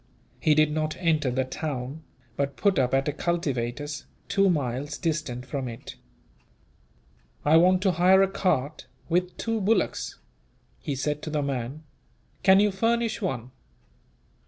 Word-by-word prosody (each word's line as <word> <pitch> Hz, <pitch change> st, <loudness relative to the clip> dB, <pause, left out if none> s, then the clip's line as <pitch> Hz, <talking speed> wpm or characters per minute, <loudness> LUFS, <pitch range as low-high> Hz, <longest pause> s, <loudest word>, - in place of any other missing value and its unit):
He 155 Hz, -, +3 dB
did 155 Hz, 0 st, +4 dB
not 155 Hz, 0 st, -2 dB
enter 155 Hz, -6 st, +1 dB
the 130 Hz, +1 st, 0 dB
town; 135 Hz, +1 st, -5 dB, 0.3 s
but 140 Hz, 0 st, -2 dB
put 200 Hz, -6 st, +2 dB
up 125 Hz, -2 st, +2 dB
at 135 Hz, +1 st, +1 dB
a -, -, +2 dB
cultivator's, 145 Hz, -4 st, -2 dB, 0.2 s
two 195 Hz, 0 st, +3 dB
miles 145 Hz, -2 st, -1 dB
distant 155 Hz, -7 st, -2 dB
from 135 Hz, 0 st, -4 dB
it. 115 Hz, -1 st, -8 dB, 1.5 s
"I 155 Hz, +2 st, +6 dB
want 185 Hz, +2 st, +4 dB
to 190 Hz, -, +4 dB
hire 185 Hz, +3 st, +5 dB
a -, -, +3 dB
cart, 155 Hz, -6 st, -1 dB, 0.2 s
with 180 Hz, +1 st, 0 dB
two 225 Hz, -1 st, -1 dB
bullocks," 220 Hz, +4 st, 0 dB, 0.6 s
he 145 Hz, -, -3 dB
said 150 Hz, +2 st, -2 dB
to 155 Hz, -, -5 dB
the 150 Hz, -1 st, -1 dB
man. 135 Hz, +2 st, -4 dB, 0.6 s
"Can 190 Hz, 0 st, +6 dB
you 205 Hz, 0 st, +4 dB
furnish 230 Hz, +3 st, 0 dB
one?" 130 Hz, -, -3 dB
155 Hz, 145 wpm, -26 LUFS, 135-185 Hz, 1.5 s, I